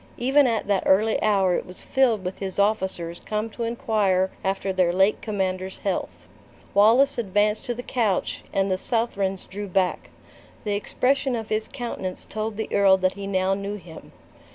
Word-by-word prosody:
Even 270 +3 +4
at 230 -2 0
that 200 -2 +2
early 215 +3 +3
hour 195 -3 +3
it - - -1
was 180 - -3
filled 240 -8 +2
with 180 - -4
his 190 -2 -4
officers 190 -5 0
come 215 +1 -3
to 235 - -9
inquire 210 -5 +1
after 195 0 -1
their 180 -2 +2
late 190 +4 +2
commander's 190 -3 -2
health. 195 -3 -4 0.5
Wallace 230 +7 +5
advanced 210 0 +1
to 240 - -2
the 245 - -6
couch, 220 -8 -1
and 195 0 0
the 185 - 0
Southrons 200 -5 -1
drew 205 +1 -6
back. 185 -1 0 0.5
The 210 - -1
expression 260 +5 0
of 225 -2 -5
his 215 0 -1
countenance 230 -7 -5
told 215 -1 -4
the 220 - -2
earl 195 -1 +5
that 185 0 +1
he 200 0 -7
now 190 -1 +1
knew 200 +1 -3
him. 180 -5 -12
200 Hz, 175 wpm, -24 LUFS, 190-225 Hz, 0.5 s, Wallace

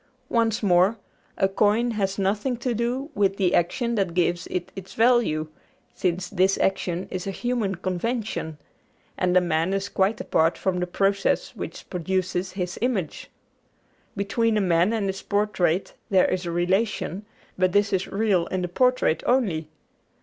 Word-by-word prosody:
Once 225 -2 +1
more, 185 +3 +4 0.4
a 195 - +3
coin 210 +5 +2
has 195 -3 -1
nothing 210 +6 0
to 245 +1 -2
do 245 +6 -2
with 195 -1 +1
the 185 -3 +2
action 235 +8 +1
that 195 -6 -1
gives 175 0 +1
it 180 -1 -4
its 190 -1 -9
value, 225 -10 +3 0.5
since 180 0 -1
this 190 0 +2
action 185 -2 -1
is 185 +1 -4
a - - -1
human 220 -1 -1
convention; 185 -2 -3 0.6
and 180 0 +2
a - - +8
man 170 +2 0
is 195 0 -2
quite 195 +3 +1
apart 160 +1 +1
from 185 -2 -1
the 180 - -1
process 195 +2 0
which - - -7
produces 185 +1 -2
his 180 -1 -4
image. 220 - -2 0.9
Between 215 +3 +1
a - - +3
man 180 0 +3
and 220 -3 -1
his 195 0 -3
portrait 200 -4 0 0.2
there 190 -2 +4
is 180 -1 -1
a - - -2
relation, 190 +3 0 0.3
but 185 -1 +2
this 205 +1 +2
is 190 0 0
real 195 -4 +1
in 185 -1 -2
the - - -1
portrait 250 -4 +2
only. 195 -12 +1
195 Hz, 160 wpm, -25 LUFS, 180-215 Hz, 0.9 s, a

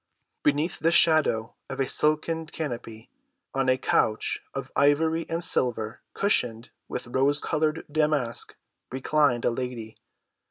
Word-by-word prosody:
Beneath 145 +4 +1
the 165 - +2
shadow 155 -10 +3 0.2
of - - -6
a 135 - +2
silken 155 +2 +1
canopy, 120 -8 -6 0.4
on 135 -1 +1
a 130 - +3
couch 110 -4 0
of - - -5
ivory 160 +3 +2
and 165 +1 0
silver 115 -7 0
cushioned 120 - 0 0.2
with - - -5
rose‐colored 145 +5 0
damask 150 -6 0 0.4
reclined 130 -2 +1
a - - +3
lady. 115 -3 -5
145 Hz, 120 wpm, -26 LUFS, 120-155 Hz, 0.4 s, shadow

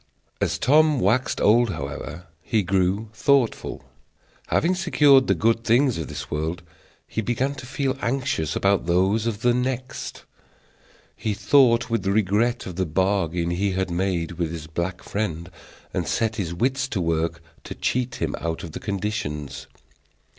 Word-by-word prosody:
As - - +1
Tom 150 +1 +4
waxed 120 +5 +1
old, 115 +3 +4
however, 75 +4 -6 0.2
he 105 +6 0
grew 95 +3 0
thoughtful. 125 - +1 0.6
Having 175 +4 +2
secured 150 -8 +4
the - - +3
good 115 +1 +1
things 120 -2 +3
of 80 - -4
this 75 -1 -7
world, 80 +3 -2 0.4
he 110 - -2
began 125 +5 -1
to 130 -2 -9
feel 135 0 -1
anxious 120 - -1
about 100 -3 +2
those 95 +6 +2
of 110 -2 -3
the 120 0 +3
next. 125 +1 -3 0.9
He 105 -2 -2
thought 125 -1 +4
with 105 -4 0
regret 105 +4 +1
of 90 -2 -7
the 95 - +1
bargain 85 -1 0
he 95 +2 0
had 95 -1 -1
made 90 -2 -1
with 85 -2 -1
his 80 -2 -6
black 85 +3 -4
friend, 90 -5 -3 0.4
and - - -1
set 110 -1 0
his 90 -6 -2
wits 130 +8 0
to 120 -8 -3
work 85 0 0 0.3
to - - -6
cheat 125 -1 -1
him 80 -3 -2
out 80 0 -3
of 85 - -7
the - - -6
conditions. 95 -8 -4
100 Hz, 155 wpm, -24 LUFS, 85-125 Hz, 0.9 s, Tom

